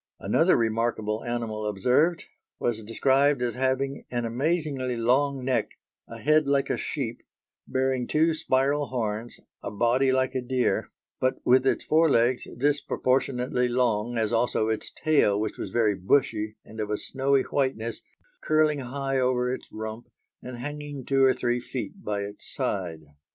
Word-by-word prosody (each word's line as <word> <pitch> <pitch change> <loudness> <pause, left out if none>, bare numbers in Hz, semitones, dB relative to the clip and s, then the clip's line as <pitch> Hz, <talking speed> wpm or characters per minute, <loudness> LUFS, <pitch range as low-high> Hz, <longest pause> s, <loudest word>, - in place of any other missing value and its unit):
Another - - +3
remarkable 110 -1 -1
animal 115 -3 -3
observed, 125 - +2 0.3
was 110 -2 -1
described 135 +5 +2
as 120 -2 0
having 130 +1 -1
an 120 -1 -2
amazingly 135 0 -1
long 130 +3 +1
neck, 130 -1 0 0.3
a 115 - -9
head 150 +5 +3
like 140 -1 +1
a - - +1
sheep, 125 -6 -4 0.5
bearing 130 -1 0
two 160 +2 +3
spiral 140 -1 +1
horns, 115 -2 -3 0.2
a - - -4
body 120 +5 +2
like 130 0 +1
a 130 - -1
deer, 125 0 0 0.3
but 130 0 +1
with 130 +2 +4
its - - +1
fore 160 +1 +4
legs 120 0 +2
disproportionately 130 -2 +1
long 120 -2 0
as 110 0 0
also 115 -1 +1
its 110 - -2
tail 140 -10 +2
which 110 - -3
was - - -4
very 110 -3 +2
bushy 105 +2 0
and 110 - -11
of 105 -1 -2
a 105 - 0
snowy 135 +2 +1
whiteness, 130 -5 -2 0.4
curling 155 -1 +2
high 135 +1 -2
over 125 -1 +1
its - - -8
rump 110 +2 -6 0.3
and 125 -1 -7
hanging 145 0 -6
two 135 -1 +3
or 130 -1 +5
three 120 0 0
feet 130 +10 -6
by 105 -1 -2
its 100 +1 -6
side. 85 -5 -2
125 Hz, 155 wpm, -26 LUFS, 115-135 Hz, 0.5 s, or